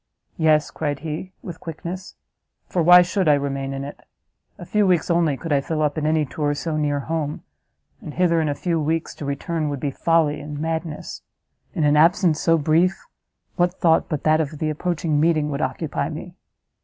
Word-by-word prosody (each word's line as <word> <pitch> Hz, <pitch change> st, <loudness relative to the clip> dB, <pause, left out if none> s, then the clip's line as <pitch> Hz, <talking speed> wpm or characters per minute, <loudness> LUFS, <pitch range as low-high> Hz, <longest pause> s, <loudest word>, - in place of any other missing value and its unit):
"Yes," 155 Hz, -2 st, +3 dB
cried 145 Hz, -2 st, -3 dB
he, 160 Hz, +4 st, -5 dB
with 175 Hz, -3 st, -8 dB
quickness, 175 Hz, +3 st, -7 dB, 0.5 s
"for 180 Hz, -, -1 dB
why 180 Hz, +2 st, +8 dB
should 185 Hz, 0 st, -1 dB
I 150 Hz, -, +6 dB
remain 135 Hz, -1 st, -2 dB
in 135 Hz, 0 st, -4 dB
it? 140 Hz, -, -8 dB, 0.6 s
a 175 Hz, -, -9 dB
few 210 Hz, +2 st, +2 dB
weeks 175 Hz, -1 st, +2 dB
only 165 Hz, -5 st, +2 dB
could 165 Hz, +1 st, -3 dB
I 140 Hz, -, +3 dB
fill 155 Hz, +2 st, -2 dB
up 150 Hz, -1 st, 0 dB
in 155 Hz, -1 st, -1 dB
any 155 Hz, -1 st, +2 dB
tour 145 Hz, +2 st, -2 dB
so 160 Hz, +1 st, -3 dB
near 145 Hz, -2 st, 0 dB
home, 155 Hz, 0 st, -3 dB, 0.6 s
and 150 Hz, -, -8 dB
hither 170 Hz, -2 st, +3 dB
in 155 Hz, -, 0 dB
a 145 Hz, -, -1 dB
few 170 Hz, +1 st, -1 dB
weeks 160 Hz, +2 st, -1 dB
to 145 Hz, -, -8 dB
return 150 Hz, +3 st, -2 dB
would 140 Hz, -2 st, -3 dB
be 140 Hz, 0 st, -2 dB
folly 155 Hz, 0 st, +1 dB
and 150 Hz, 0 st, -7 dB
madness; 160 Hz, 0 st, -4 dB, 0.5 s
in 160 Hz, -, 0 dB
an 150 Hz, 0 st, +4 dB
absence 165 Hz, 0 st, +4 dB
so 165 Hz, -1 st, +4 dB
brief, 165 Hz, +5 st, +2 dB, 0.6 s
what 175 Hz, +1 st, +2 dB
thought 165 Hz, -3 st, +2 dB
but 150 Hz, -3 st, -3 dB
that 155 Hz, +1 st, +4 dB
of 155 Hz, 0 st, -4 dB
the 155 Hz, +1 st, -1 dB
approaching 160 Hz, -1 st, -1 dB
meeting 155 Hz, -2 st, +2 dB
would 140 Hz, +1 st, -3 dB
occupy 140 Hz, +2 st, -2 dB
me? 175 Hz, +3 st, -7 dB
155 Hz, 195 wpm, -22 LUFS, 145-170 Hz, 0.6 s, why